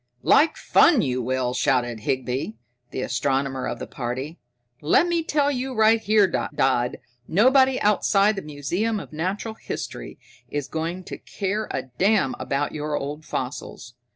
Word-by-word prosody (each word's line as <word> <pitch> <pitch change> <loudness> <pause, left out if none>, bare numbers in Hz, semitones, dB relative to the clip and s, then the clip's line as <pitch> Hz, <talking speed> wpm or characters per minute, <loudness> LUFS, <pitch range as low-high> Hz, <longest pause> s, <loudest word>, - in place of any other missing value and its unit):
"Like 310 +2 +4
fun 310 -8 +4
you 130 -2 -1
will!" 125 0 -1
shouted 125 -3 +1
Higby, 130 +1 -2 0.3
the 130 - -4
astronomer 135 +1 -1
of - - -3
the - - -6
party. 130 +6 -5 0.4
"Lemme 335 - +3
tell 290 -2 +1
you 260 -1 -3
right 220 +1 +4
here, 215 -1 +4
Dodd, 130 -8 0 0.3
nobody 260 - +4
outside 210 0 +3
the 195 - -4
Museum 175 +10 -2
of 190 - -10
Natural 190 +8 -3
History - - -7 0.3
is 145 -2 -3
going 165 +3 -4
to - - -8
care 205 +2 -3
a - - -3 0.2
damn 195 -8 +3
about 140 +1 -1
your 150 -1 -3
old 150 +3 -5
fossils. 125 -2 -5
160 Hz, 145 wpm, -24 LUFS, 130-215 Hz, 0.4 s, Like